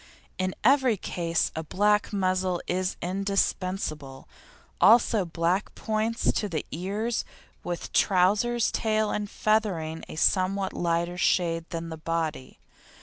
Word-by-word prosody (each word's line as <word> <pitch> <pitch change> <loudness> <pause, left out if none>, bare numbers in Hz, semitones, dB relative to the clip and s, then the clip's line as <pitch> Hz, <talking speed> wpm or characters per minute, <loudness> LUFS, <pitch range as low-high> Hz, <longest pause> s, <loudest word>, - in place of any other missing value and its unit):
In 185 0 -1
every 260 -3 +4
case 170 -2 -1
a 160 - -2
black 210 +5 +1
muzzle 185 -2 0
is 185 +1 -1
indispensable, 185 -6 -2 0.5
also 215 +1 +5
black 170 +4 -1
points 220 +1 0
to 210 - -2
the 160 -4 -3
ears, 205 +7 -2 0.4
with 175 -1 -5
trousers, 210 +6 +3
tail 215 -1 0
and 210 -1 -3
feathering 185 -9 0
a - - -7
somewhat 190 +3 +1
lighter 170 +1 -1
shade 165 -2 +1
than 165 -1 -5
the 160 - -6
body. 160 -4 -3
185 Hz, 120 wpm, -27 LUFS, 170-210 Hz, 0.5 s, also